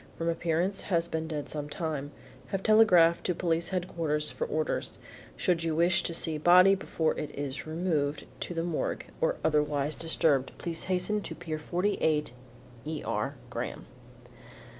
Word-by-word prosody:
From 165 0 -1
appearance 170 +3 0
has 170 -2 +2
been 160 -1 -3
dead 150 -3 -4
some 150 -1 -5
time. 150 -2 -3 0.4
Have 195 -1 -3
telegraphed 180 -7 +5
to 180 - 0
Police 170 0 0
Headquarters 165 -5 -1
for - - -3
orders. 155 +1 -2 0.4
Should 170 -2 +1
you 165 -1 0
wish 175 +2 +3
to 170 - -3
see 160 -2 +1
the - - -16
body 180 +2 +7
before 165 -4 -1
it 150 - -3
is 145 +1 -4
removed 155 -3 -1
to 175 - -5
the 165 - -1
Morgue 170 -2 -2 0.2
or - - +2
otherwise 150 -1 +1
disturbed, 155 -5 +1
please 165 -1 -2
hasten 190 +3 +1
to - - -6
Pier 160 -3 -5
48 160 - 0 0.5
E. 155 -1 -4
R. - - -2 0.2
GRAHAM. - - -5
165 Hz, 160 wpm, -29 LUFS, 150-180 Hz, 0.5 s, body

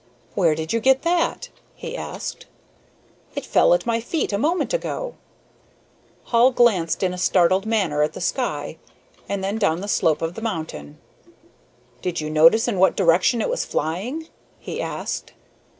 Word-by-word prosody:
"Where 170 -6 +2
did 160 +4 -4
you 230 - +2
get 265 +3 +3
that?" 345 +8 0 0.3
he 480 0 -7
asked. - - -6 0.9
"It - - -4
fell - - +4
at - - -3
my 230 -1 +1
feet 270 -1 -2
a 200 - 0
moment 335 - 0
ago." - - -3 1.1
Hall 240 +1 +4
glanced 205 -10 +2
in 180 -1 +1
a 180 - -6
startled 185 +2 +3
manner 190 -10 +1
at 150 +1 +1
the - - -7
sky, 245 +9 -2 0.5
and 200 -1 -2
then 200 +3 -2
down 180 -5 +1
the 200 - -5
slope 160 -6 +1
of 165 +1 -2
the 225 - -8
mountain. 155 - -5 1.0
"Did 180 -2 -2
you 155 0 -4
notice 165 +10 +5
in 210 -6 -1
what 190 - +4
direction 185 +6 +3
it - - -1
was - - -1
flying?" 215 - -3 0.3
he - - -5
asked. - - -5
200 Hz, 165 wpm, -22 LUFS, 165-245 Hz, 1.1 s, notice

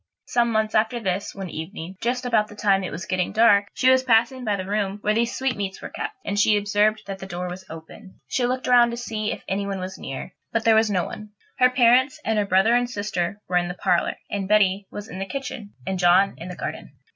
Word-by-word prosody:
Some 235 -1 +1
months 220 -1 0
after 220 +3 +2
this, 195 -2 -3
one 190 -4 -6
evening, 165 +2 -7
just 245 +2 -1
about 220 -4 +2
the 210 - -13
time 195 -2 +2
it 185 - -3
was 175 - -6
getting 185 0 -1
dark, 205 -2 +5
she 255 - +1
was 260 0 +5
passing 250 +1 +2
by 210 -3 0
the 185 -1 -4
room 200 0 -1
where 210 - +1
these 235 +2 0
sweetmeats 205 -8 -2
were - - -7
kept, 425 - -5
and 205 0 -1
she 210 0 +4
observed 210 +1 +1
that 195 -1 -6
the 190 - -8
door 180 -1 -4
was 185 +1 -7
open. 165 +5 -12
She 245 -2 0
looked 255 +1 -2
round 245 -1 +5
to 235 - -5
see 220 -3 -3
if - - -6
anybody 195 0 -2
was 185 +1 -6
near, 135 0 -7 0.2
but 230 -1 -1
there 225 - +6
was 220 0 +4
no 185 -4 +1
one. 210 +3 -8 0.3
Her 250 - +6
parents, 250 +2 +4
and 220 -1 +1
her 205 - 0
brother 190 +5 +4
and 245 0 +2
sister, 205 -4 -3
were 180 - +1
in 175 0 +1
the 180 - -5
parlour, 180 -2 +1 0.2
and 200 -2 -2
Betty 200 -1 +3
was 205 +1 -8
in 185 - -8
the 195 - -2
kitchen, 265 -5 -6
and 190 -1 -2
John 180 +2 +5
was - - -17
in 170 - -7
the 180 - -7
garden. - - -6
205 Hz, 245 wpm, -24 LUFS, 190-230 Hz, 0.3 s, there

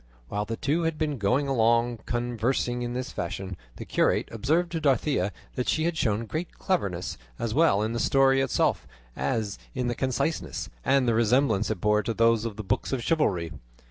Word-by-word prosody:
While 105 0 -2
the 115 +1 -4
two 155 +5 0
had 165 -2 -1
been 150 -4 -1
going 125 +8 +2
along 120 -2 +2
conversing 120 +1 -1
in 120 0 -3
this 130 +1 -3
fashion, 95 +2 -4 0.2
the - - -8
curate - - +1
observed 155 +10 +1
to 165 -2 -2
Dorothea 135 -7 +2 0.2
that 125 - -2
she 155 - +1
had 170 0 0
shown 115 -7 0
great 155 +9 -5
cleverness, 95 - -2 0.2
as 115 -2 -2
well 145 -9 +4
in 110 - -1
the 120 - -2
story 135 +1 +4
itself 135 - +1 0.3
as 100 - -2 0.2
in 125 -1 -1
its 120 - -5
conciseness, 135 - -2
and 135 - +3
the 115 - +3
resemblance 115 -1 +2
it 110 -4 -2
bore 105 0 +3
to 115 +1 -3
those 115 0 +3
of 115 -3 -3
the 110 - -6
books 95 - -1
of 130 -3 -1
chivalry. 95 - +1
120 Hz, 190 wpm, -27 LUFS, 110-140 Hz, 0.3 s, well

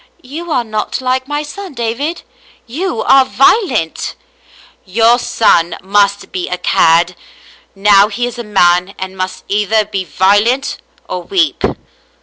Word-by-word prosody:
*' - - -30
You 340 +1 -6
are 250 -5 +1
not 215 -2 -3
like 260 0 -1
my 295 +1 -2
son, 370 +2 -9
David. 240 +8 -3 0.4
You 310 +3 -3
are 270 0 +5
violent." 260 - +1 0.4
" - - -24 0.3
Your 225 +5 +3
son 170 -8 +2
has 200 +1 0
been 180 -1 -5
a 180 - -1
cad. 170 0 +2 0.6
Now 200 0 +5
he 235 +3 -3
is 245 0 -6
a - - -4
man, 180 -2 +2
and 190 0 -6
must 185 0 -5
either 210 +1 +1
be 200 -2 -3
violent 205 +9 +1 0.3
or - - -4
weep." 365 -5 -1
215 Hz, 145 wpm, -14 LUFS, 190-260 Hz, 0.6 s, are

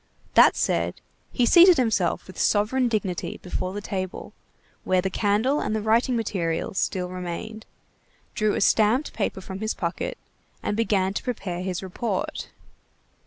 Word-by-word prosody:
That - - +7
said, - - 0 0.3
he 245 - +2
seated 350 +5 +7
himself 220 -8 +1
with 185 - -11
sovereign 225 +5 +2
dignity 205 -6 -2
before 185 0 -3
the 205 +2 -5
table, 185 -2 -5 0.5
where 185 0 +2
the 190 +1 -1
candle 220 +9 +1
and 215 - -1
the 215 - -1
writing 230 +3 +2
materials 190 -6 -2
still 180 -1 -1
remained, 185 +5 -6 0.7
drew 215 -1 +1
a - - -1
stamped 220 +8 +3
paper 200 -3 -2
from 190 0 -7
his 215 +1 -2
pocket, 170 0 -3 0.5
and 205 - -1
began 200 -4 +1
to - - -4
prepare 195 -8 -4
his 185 0 -3
report. 230 - -3
205 Hz, 150 wpm, -25 LUFS, 185-230 Hz, 0.7 s, That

